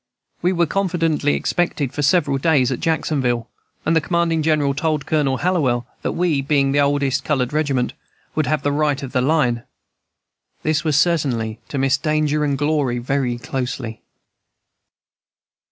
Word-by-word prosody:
We 180 - +2
were 175 -2 +2
confidently 165 -5 0
expected 160 -7 -1
for - - -2
several 145 -3 +2
days 135 -4 +3
at 125 - -2
Jacksonville, 135 -8 0 0.4
and 160 - +2
the 160 - +4
commanding 170 -1 +1
general 150 -3 +2
told 150 0 -1
Colonel 145 -4 +1
Hallowell 140 -9 +1 0.2
that - - -2
we, 170 -6 +1
being 140 -1 +2
the 145 - +2
oldest 140 -2 +1
colored 135 -3 0
regiment, 140 -5 0 0.4
would 155 -4 0
have 155 +2 0
the 145 - +1
right 145 -1 0
of 130 - -6
the 130 - +1
line. 130 -4 +2 1.0
This 155 0 +1
was 155 -4 +1
certainly 130 -9 +1
to 140 - -5
miss 135 +1 +2
danger 150 -1 +1
and 140 -2 0
glory 145 -4 0
very 125 0 -1
closely." 125 -2 -4
145 Hz, 155 wpm, -20 LUFS, 130-155 Hz, 1.0 s, the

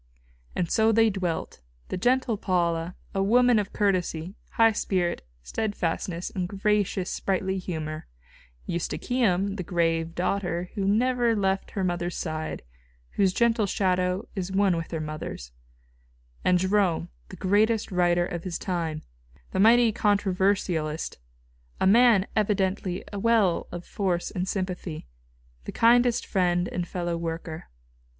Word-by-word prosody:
And 175 - 0
so 220 0 +4
they 225 0 +4
dwelt, 180 - -3 0.3
the - - -2
gentle 245 +3 +1
Paula, 175 -3 -1 0.2
a 195 - 0
woman 240 +3 +4
of 205 -1 -3
courtesy, 185 -4 0 0.2
high 225 0 +5
spirit, 180 -4 -1 0.2
steadfastness 180 - -2
and 180 -2 -3
gracious, 200 -2 0
sprightly 190 0 -1
humour; 155 -4 -5 0.6
Eustochium, 200 +2 0
the 185 - -3
grave 165 -1 0
young 165 - -14
daughter 175 -1 -2
who 195 - -2
never 240 +2 +2
left 195 -2 0
her 195 - +1
mother's 175 -1 -2
side, 155 -2 -4 0.5
whose 195 -2 +2
gentle 225 0 +2
shadow 185 +1 0
is 190 -2 -4
one 195 -2 +3
with 165 0 -4
her 165 - -3
mother's; 155 - -6 0.9
and 180 - +4
Jerome, 190 -1 +1 0.2
the - - -9
greatest 210 +3 +1
writer 175 -1 +2
of 175 -2 -5
his 180 -3 -3
time, 165 -4 -3 0.5
the - - -2
mighty 230 +2 +6
controversialist, 190 - 0 0.6
a - - +2
man 220 -1 +6
evidently 195 -3 0
a 200 - -3
well 215 -5 +2
of 175 - -7
force 180 -4 -1
and 180 0 -3
sympathy, 185 -4 -4 0.6
the - - -5
kind 240 +1 +5
friend 180 -5 0
and 175 -1 -3
fellow 175 -1 -2
worker. 165 -1 -5
185 Hz, 135 wpm, -26 LUFS, 175-205 Hz, 0.9 s, mighty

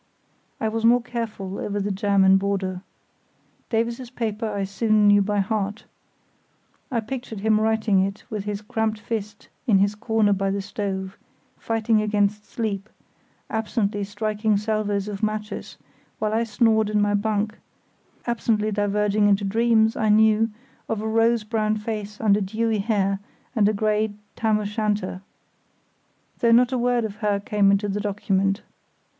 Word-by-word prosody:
I 220 - 0
was 225 +1 -2
more 235 +1 +5
careful 225 -6 -5
over 205 0 -2
the 200 +1 -1
German 195 -1 +4
border. 190 -2 -2 0.9
Davies's 235 +2 -1
paper 225 -2 -3
I 200 -1 -2
soon 210 +2 +2
knew 205 0 +6
by 205 0 +1
heart. 205 +1 -2 1.1
I 235 -3 0
pictured 230 -3 -6
him 215 0 +3
writing 220 -2 +2
it 195 +2 -1
with 210 -2 -5
his 205 0 -4
cramped 220 0 -1
fist 210 -2 -5 0.2
in 210 -5 +5
his 200 +1 +2
corner 220 -1 +1
by 195 0 0
the 200 +1 -1
stove, 195 -1 -4 0.4
fighting 225 -1 +1
against 210 0 0
sleep, 215 -3 -3 0.6
absently 215 -2 -1
striking 210 +1 0
salvos 210 -1 -1
of 200 -2 -5
matches, 215 0 -3 0.4
while 215 0 -1
I 230 +1 +1
snored 220 -1 +2
in 210 0 +1
my 205 0 +2
bunk; 215 +1 -1 0.7
absently 220 -3 0
diverging 205 0 +1
into 200 0 +3
dreams, 220 +2 +3
I 220 - +1
knew, 220 +1 +4 0.4
of 220 -2 -1
a - - -2
rose 225 0 +2
brown 215 -1 0
face 210 -1 -5
under 210 -1 +3
dewy 220 +2 0
hair 195 -2 0 0.4
and 210 -3 +4
a - - 0
grey 215 0 0 0.2
tam 220 -2 +2
o' 210 - -3
shanter; 210 -3 -2 1.2
though 235 - +3
not 245 +2 +5
a 255 - 0
word 245 -1 +1
of 210 -1 -6
her 210 -2 0
came 200 0 +2
into 200 +1 +2
the 205 +1 -2
document. 195 -1 0
210 Hz, 150 wpm, -24 LUFS, 200-220 Hz, 1.2 s, knew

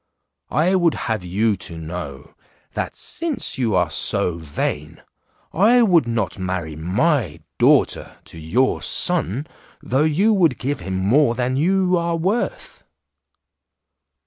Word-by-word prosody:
I 160 +7 +1
would 175 -4 +2
have 110 -5 -3
you 100 +5 0
to 85 -2 -4
know, 80 -4 -8 0.4
that - - -4
since 305 - -2
you 115 -5 0
are 90 -1 +1
so 85 -1 +1
vain, 75 0 -4 0.5
I 230 +8 +4
would 175 - +3
not 115 -5 -2
marry 90 -4 -4
my 90 - -1 0.2
daughter - - +2
to 80 - -11
your 110 +12 0
son 155 - +2 0.3
though 130 +3 -1
you 180 +8 +2
would 165 - +2
give 135 +3 -3
him 95 +1 -4
more 120 +7 +2
than 125 +1 -1
you 185 +4 +2
are 170 0 -1
worth." 190 +8 -3
125 Hz, 130 wpm, -20 LUFS, -, 0.5 s, I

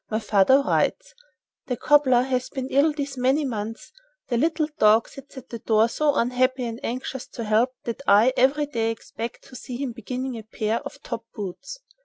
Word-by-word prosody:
My 215 - 0
father 225 +5 +4
writes: - - 0 0.5
"The 250 -2 -2
cobbler 265 -4 +4
has 255 -1 -1
been 265 -2 -5
ill 285 +3 +3
these 285 -2 -5
many 265 +4 +2
months. 225 -2 -5 0.4
The 240 - +1
little 315 +4 +1
dog 215 +2 +5
sits 275 0 -13
at 260 0 -10
the 235 - -6
door 220 0 +3
so 295 +4 +1
unhappy 255 +1 +1
and 230 0 -6
anxious 255 +1 -4
to 235 - -7
help 225 +4 +2
that 235 +3 -5
I 225 +6 +6
every 275 +4 +3
day 230 -6 -1
expect 225 +1 -6
to 260 - -13
see 250 0 -7
him 270 -1 -3
beginning 250 +2 -5
a - - -10
pair 220 +1 -2
of 280 0 -10
top 230 -2 -5
boots." 220 - -7
250 Hz, 190 wpm, -24 LUFS, 230-275 Hz, 0.5 s, I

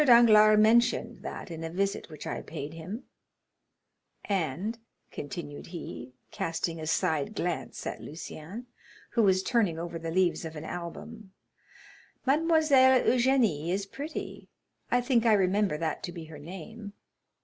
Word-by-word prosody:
Danglars 220 -5 +7
mentioned 235 +3 +3
that - - -7
in 165 0 -6
a 165 - -3
visit 195 +3 -2
which 155 -2 -9
I - - -3
paid 150 -1 -7
him; 180 +9 -7 1.2
and," 195 - -1 0.3
continued 145 0 -7
he, 140 -7 -8 0.2
casting 165 0 -2
a 155 - -5
side 160 +3 0
glance 175 -1 -3
at - - -4
Lucien, 165 +8 -8 0.5
who 235 - +2
was 190 -3 +4
turning 210 -10 +1
over 170 0 -5
the 165 0 -4
leaves 180 0 +1
of 160 -1 -6
an 150 - -7
album, 190 +4 -7 0.9
"Mademoiselle 280 -3 +5
Eugénie 235 - +3
is 195 +2 0
pretty—I 275 -1 -5
think 240 -2 +2
I 220 - +6
remember 195 -3 +2
that 160 -1 -2
to 175 - -6
be 170 -2 -8
her 155 -2 -11
name." 195 +6 -9
190 Hz, 140 wpm, -29 LUFS, 165-230 Hz, 1.2 s, Danglars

